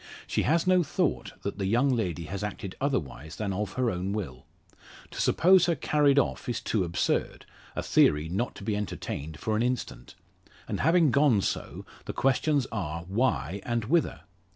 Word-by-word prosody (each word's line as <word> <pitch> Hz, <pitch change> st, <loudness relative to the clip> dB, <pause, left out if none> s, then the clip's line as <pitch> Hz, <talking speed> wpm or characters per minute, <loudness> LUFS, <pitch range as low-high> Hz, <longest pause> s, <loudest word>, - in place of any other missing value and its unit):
She -, -, 0 dB
has 165 Hz, +2 st, +2 dB
no 185 Hz, -1 st, +4 dB
thought 160 Hz, -, -1 dB
that 100 Hz, 0 st, -4 dB
the 95 Hz, -, -1 dB
young 120 Hz, +7 st, +3 dB
lady 90 Hz, -7 st, -2 dB
has 100 Hz, +5 st, -5 dB
acted 100 Hz, -2 st, -5 dB
otherwise 80 Hz, -, -2 dB
than 100 Hz, -3 st, -3 dB
of 100 Hz, 0 st, -3 dB
her 125 Hz, -3 st, +1 dB
own 95 Hz, +2 st, -3 dB
will. 65 Hz, -12 st, -5 dB, 0.6 s
To -, -, -4 dB
suppose 180 Hz, 0 st, +5 dB
her 170 Hz, -, +2 dB
carried 145 Hz, -1 st, +2 dB
off 140 Hz, -, 0 dB
is 120 Hz, -, -1 dB
too 105 Hz, -4 st, 0 dB
absurd 85 Hz, -1 st, -1 dB, 0.3 s
a -, -, -2 dB
theory 75 Hz, +2 st, +3 dB
not 100 Hz, +9 st, -2 dB
to -, -, -10 dB
be 105 Hz, 0 st, -1 dB
entertained 80 Hz, -6 st, -5 dB
for 110 Hz, -, -1 dB
an 110 Hz, -, +1 dB
instant. 125 Hz, 0 st, -3 dB, 0.5 s
And -, -, -3 dB
having 165 Hz, -1 st, +4 dB
gone 140 Hz, -7 st, +4 dB
so, -, -, -4 dB, 0.2 s
the -, -, -4 dB
questions 135 Hz, +1 st, +1 dB
are, 85 Hz, -6 st, -3 dB
why 95 Hz, -, -1 dB
and 120 Hz, -2 st, -1 dB
whither? 165 Hz, +7 st, +1 dB
110 Hz, 175 wpm, -28 LUFS, 95-140 Hz, 0.6 s, suppose